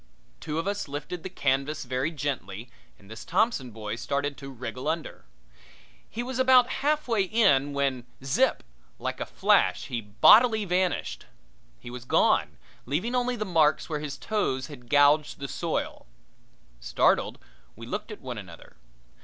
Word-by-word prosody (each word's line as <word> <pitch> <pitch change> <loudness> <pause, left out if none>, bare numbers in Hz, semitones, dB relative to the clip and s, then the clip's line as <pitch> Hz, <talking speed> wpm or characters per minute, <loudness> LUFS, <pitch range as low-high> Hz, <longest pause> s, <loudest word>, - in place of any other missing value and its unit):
Two 155 -1 -4
of 165 - -1
us 200 -3 -2
lifted 145 +5 -6
the 190 - -6
canvas 140 -2 -1
very 130 +3 -1
gently 125 - -5 0.3
and 100 - -20
this 110 +2 -9
Thompson 185 - +1
boy 110 -1 -5
started 140 +3 -2
to 135 +1 -9
wriggle 125 +1 -6
under. 160 0 -3 0.8
He 235 - -4
was 260 +1 -4
about 260 -1 +6
halfway 285 -7 +1
in 180 -9 +3
when 135 -3 -1 0.2
zip! 135 0 +1 0.3
like - - -4
a - - -4
flash - - +2
he 120 -3 -2
bodily 210 - +5
vanished. 180 0 -1 0.5
He 120 - -10
was 125 0 -8
gone, - - +2 0.3
leaving 180 - -1
only 250 0 0
the 215 -2 -3
marks 160 -5 +2
where 150 -2 -2
his 145 -2 -5
toes 135 - -1
had 125 -4 -12
gouged 145 +1 +4
the 140 - -5
soil. - - -3 0.7
Startled, - - +1 0.4
we 115 - -10
looked 205 - -5
at 210 - -9
one 125 -4 -6
another. 85 -9 -13
145 Hz, 155 wpm, -27 LUFS, 125-200 Hz, 0.8 s, about